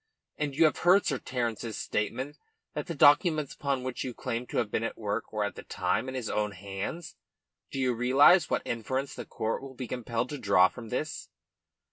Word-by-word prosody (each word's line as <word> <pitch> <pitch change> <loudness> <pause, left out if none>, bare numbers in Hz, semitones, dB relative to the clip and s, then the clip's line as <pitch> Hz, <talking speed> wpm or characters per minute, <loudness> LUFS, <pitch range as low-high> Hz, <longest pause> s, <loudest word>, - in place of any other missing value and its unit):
And 145 -2 -2
you 165 +3 +5
have 155 - +2
heard 180 +3 +5
Sir 135 -4 0
Terence's 115 -3 -3
statement 130 +7 -2 0.4
that - - -4
the 170 - -4
documents 150 +1 +5
upon 140 -3 -2
which 130 -1 -3
you 125 -3 -5
claim 125 -1 -3
to - - -4
have 110 -4 0
been 110 - 0
at 115 - -3
work 105 +1 -3
were 105 -1 -1
at 100 - -2
the - - -9
time 95 +7 -1
in 130 - -6
his 125 -4 -3
own 105 -1 -1
hands. 100 - -6 0.5
Do - - -6
you 130 -1 +2
realise 135 +9 +5
what - - 0
inference 130 +4 -2
the - - -7
court 110 +1 -2
will 135 -1 -9
be 125 -1 -5
compelled 120 0 -2
to 145 - -5
draw 100 -4 +5
from 115 -3 -10
this?" 150 +6 -3
125 Hz, 205 wpm, -29 LUFS, 110-140 Hz, 0.5 s, you